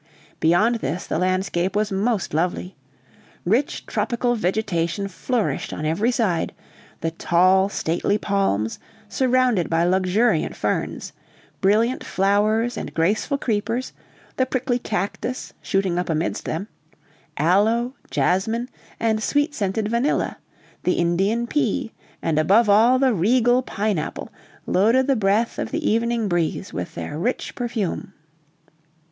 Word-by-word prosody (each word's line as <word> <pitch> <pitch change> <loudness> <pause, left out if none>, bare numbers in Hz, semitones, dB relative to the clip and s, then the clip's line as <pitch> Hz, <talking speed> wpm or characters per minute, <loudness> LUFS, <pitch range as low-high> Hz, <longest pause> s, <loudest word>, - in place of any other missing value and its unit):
Beyond 205 +9 +3
this, 165 +3 -3
the - - -2
landscape 185 0 0
was 210 0 +1
most 200 -1 0
lovely. 180 +3 -1 0.7
Rich 230 +10 0
tropical 240 -1 0
vegetation 195 -3 -1
flourished 225 +5 -2
on 155 - -4
every 180 +10 +1
side: 205 -9 0 0.5
the 165 - -1
tall, 185 +4 +3
stately 175 +2 0
palms, 195 - 0 0.3
surrounded 255 -6 +2
by 165 0 +2
luxuriant 190 +6 +2
ferns; - - -2 0.5
brilliant 220 +6 +2
flowers 210 +5 +1
and - - -6
graceful 210 - +1
creepers; 230 +1 -2 0.4
the 260 - +2
prickly 250 -1 -1
cactus, 215 +4 -3
shooting 190 -3 0
up 180 - -3
amidst 160 +1 -1
them; 165 +6 -3 0.7
aloe, 220 - +2 0.2
jasmine, 225 +7 0 0.3
and 220 -1 +1
sweet 290 +6 +1
scented 210 -2 -1
vanilla; 235 +6 0 0.4
the 180 - +1
Indian 195 +7 +1
pea, 235 -4 -1 0.3
and 155 -2 +1
above 200 +9 +4
all 225 +5 +5
the 260 -2 +3
regal 245 +6 +3
pine 210 -6 -1
apple, - - -6 0.3
loaded 230 +7 +3
the 275 0 +2
breath 215 +1 +1
of - - -2
the 315 -1 -2
evening 230 0 +1
breeze 175 0 -1
with 90 - -5
their 85 - -5
rich 245 +8 -2
perfume. 225 -6 -3
205 Hz, 125 wpm, -22 LUFS, 180-235 Hz, 0.7 s, all